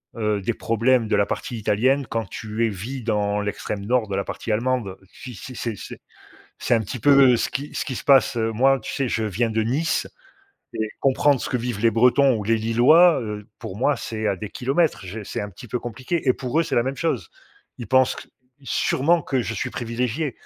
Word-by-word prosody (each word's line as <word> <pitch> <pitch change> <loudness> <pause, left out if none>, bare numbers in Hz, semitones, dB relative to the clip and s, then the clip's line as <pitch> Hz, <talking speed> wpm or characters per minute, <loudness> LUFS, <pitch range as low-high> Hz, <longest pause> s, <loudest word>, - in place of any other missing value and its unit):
heu, 105 -3 0
des 115 +5 -1
problèmes 115 +1 +1
de - - +2
la 100 - +3
partie 120 - -4
italienne 125 +5 +1
quand 115 0 -2
tu 110 +1 -2
es - - +1
vis 115 +6 -6
dans 105 -2 0
l'extrême 105 0 -4
nord 120 -1 +1
de 100 - -3
la 100 - 0
partie 110 - -4
allemande. 115 -4 -1 0.2
Si 125 -3 -10
c'est 125 +7 -9
c'est 115 -2 -3
c'est - - -9 0.6
c'est - - 0
un 115 - +3
petit 110 +5 -6
peu 135 -3 +6
ce - - -1
qui 140 +3 -4
ce - - -2
qui 130 - -4
se - - -6
passe 135 -3 +4
heu, 115 -1 0
moi, 135 +4 +3
tu - - -7
sais, 135 -2 -1
je 115 -2 -1
viens 110 +3 -1
de 110 0 +1
Nice 135 +9 0 0.7
et 110 -1 -2
comprendre 135 0 +2
ce - - -4
que 125 - 0
vivent 120 -3 -3
les 115 0 +3
Bretons 125 +3 +4
ou 105 - -4
les 115 +2 +2
Lillois, 130 +9 +5
heu, 105 -2 -6
pour 95 - -7
moi 140 +6 +2
c'est 110 -1 -4
à 100 - +1
des 105 +2 -7
kilomètres. 135 - 0
J'ai 105 +4 -6
c'est 100 - -5
un 105 - -6
petit 115 +6 -13
peu 125 - -2
compliqué, 130 +8 -4
et - - +6
pour 125 +4 -2
eux 165 - +3
c'est - - -3
la 120 - +3
même 135 +3 -3
chose. 165 +2 -2 0.5
Ils 120 - -6
pensent 130 +3 +3
q - - -10 0.4
sûrement 160 +5 +1
que 130 -3 -1
je 115 - -4
suis 130 - -2
privilégié 125 +4 -2
120 Hz, 230 wpm, -23 LUFS, 110-130 Hz, 0.7 s, peu